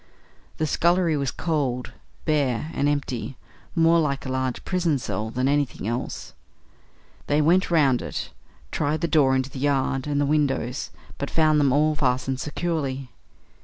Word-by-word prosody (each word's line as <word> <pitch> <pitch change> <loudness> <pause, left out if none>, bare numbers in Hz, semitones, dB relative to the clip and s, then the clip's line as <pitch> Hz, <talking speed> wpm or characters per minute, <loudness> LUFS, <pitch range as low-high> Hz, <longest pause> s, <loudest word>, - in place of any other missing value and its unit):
The 155 - 0
scullery 170 +1 +2
was 140 -2 0
cold, 140 -7 -2 0.3
bare, 150 -2 0
and 140 +1 +1
empty; 135 -3 -3 0.4
more 165 0 +5
like 140 -4 -1
a 130 - -3
large 130 -1 -2
prison 175 -5 +1
cell 110 -3 -3
than 125 +3 0
anything 140 -7 0
else. 120 +2 -4 0.9
They 145 +1 +2
went 175 +5 +3
round 140 -7 +3
it, - - -5 0.4
tried 155 +1 -1
the 170 - +1
door 140 -5 +4
into 130 +1 -1
the 135 - -7
yard, 135 -1 0
and 145 -1 0
the 145 - +2
windows, 140 -3 0 0.3
but 140 - -3
found 155 -2 +3
them 140 -2 +3
all 155 +3 +3
fastened 130 -2 0
securely. 140 -4 -3
145 Hz, 155 wpm, -24 LUFS, 130-155 Hz, 0.9 s, more